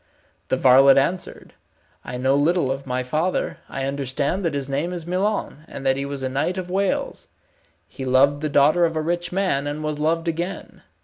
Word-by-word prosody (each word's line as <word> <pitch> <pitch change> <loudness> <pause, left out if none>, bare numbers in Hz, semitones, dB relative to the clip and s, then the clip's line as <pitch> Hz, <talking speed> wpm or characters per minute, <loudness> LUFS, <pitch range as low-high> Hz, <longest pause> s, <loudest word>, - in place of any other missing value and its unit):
The - - 0
varlet 135 +1 +6
answered, 175 +7 -2 0.5
"I 125 - -6
know 130 +2 +1
little 145 0 +2
of 135 0 -5
my 125 0 -1
father. 155 +8 -1
I 135 - -4
understand 140 +6 -2
that 165 -4 -1
his 140 -2 -2
name 145 +6 -2
is 170 -3 -5
Milon, 185 -3 -2
and 135 - -8
that 135 0 +3
he 140 +1 -3
was 140 -1 -5
a - - 0
knight 145 +8 -1
of 180 -1 -5
Wales. 195 0 -1 0.6
He 135 - -8
loved 135 +3 +3
the 155 - -1
daughter 150 +5 +4
of 165 -1 -2
a 155 - 0
rich 175 +2 -2
man, 180 -7 0
and 150 +1 -4
was 155 -1 -3
loved 165 +2 0
again. 170 +3 -4
145 Hz, 195 wpm, -22 LUFS, 135-175 Hz, 0.6 s, varlet